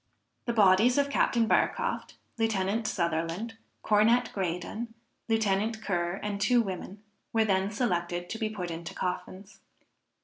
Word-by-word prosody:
The 235 - 0
bodies 215 +4 +5
of 280 0 +2
Captain 235 -4 +3
Barcroft, 480 - 0 0.2
Lieutenant 215 0 0
Sutherland, 170 +7 -2 0.2
Cornet 225 +3 +4
Graydon, 195 +5 -3 0.3
Lieutenant 220 0 +1
Ker 175 -1 -1
and 205 -1 -3
two 240 +4 +4
women, 195 -1 -4 0.3
were 225 -1 +3
then 190 -1 +1
selected 175 -6 -1
to 225 - -4
be 220 -2 0
put 180 -5 -5
into 165 +1 -6
coffins. 185 +2 -5
205 Hz, 130 wpm, -29 LUFS, 185-225 Hz, 0.3 s, bodies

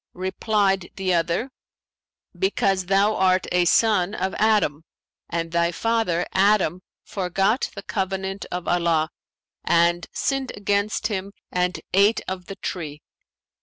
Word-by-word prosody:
Replied 195 0 0
the 190 -2 0
other, 175 +9 0 0.8
'Because 195 - 0
thou 200 +3 +3
art 185 0 +3
a 180 0 +3
son 205 0 +3
of 190 -2 -2
Adam 205 -9 +2 0.5
and 165 -1 -3
thy 170 0 +2
father 200 -4 0
Adam 190 -3 +3 0.2
forgot 195 +5 0
the 200 - -7
covenant 190 -1 -3
of 180 0 -4
Allah 170 -2 +1 0.5
and 170 0 +2
sinned 270 -2 -2
against 205 +1 0
Him 200 -2 -2 0.2
and 180 0 0
ate 200 +4 +4
of 185 -1 -5
the 195 - -7
tree.' 155 -7 -6
190 Hz, 125 wpm, -23 LUFS, 175-205 Hz, 0.8 s, ate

